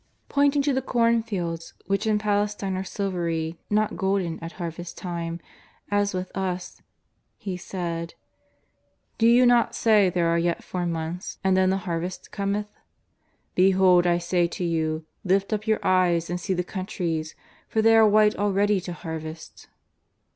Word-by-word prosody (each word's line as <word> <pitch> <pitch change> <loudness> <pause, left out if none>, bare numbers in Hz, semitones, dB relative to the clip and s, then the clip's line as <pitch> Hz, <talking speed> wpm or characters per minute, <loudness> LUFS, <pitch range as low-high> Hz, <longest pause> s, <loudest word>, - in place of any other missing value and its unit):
Pointing 285 0 +3
to 285 0 +1
the 265 - +1
cornfields, 225 -9 0
which 195 +3 0
in 215 -1 +3
Pales 210 0 0
tine 195 -2 -3
are 185 - -2
silvery 170 -5 -3
not 210 0 +1
golden 190 -4 0
at 165 0 -7
harvest 170 -1 -6
time, 170 -2 -4 0.5
as 205 0 +2
with 185 0 -5
us, 185 -2 -4 0.6
He 190 -3 -5
said: 170 -2 -5 0.5
" - - -46
Do 225 - +5
you 245 +2 +6
not 240 -1 +4
say 210 -4 +4
there 175 -1 +1
are 170 0 +2
yet 170 0 -1
four 180 -1 -3
months 165 +1 -4
and 190 -1 +3
then 185 0 +3
the 190 - +2
harvest 175 +1 -4
cometh? 205 +1 -2 0.8
Behold 185 -1 +5
I 175 0 +3
say 175 0 +1
to 175 - -5
you, 160 -2 -1 0.2
lift 195 +3 +1
up 215 +1 -3
your 220 -1 +3
eyes 175 -3 +2
and 175 - -2
see 190 +1 -1
the 180 - -1
countries, 175 -4 -3 0.3
for 220 - +1
they 225 0 +6
are 220 -1 +7
white 210 0 +4
already 205 0 +2
to 180 0 -6
harvest." 160 -1 -8
185 Hz, 160 wpm, -25 LUFS, 170-205 Hz, 0.8 s, are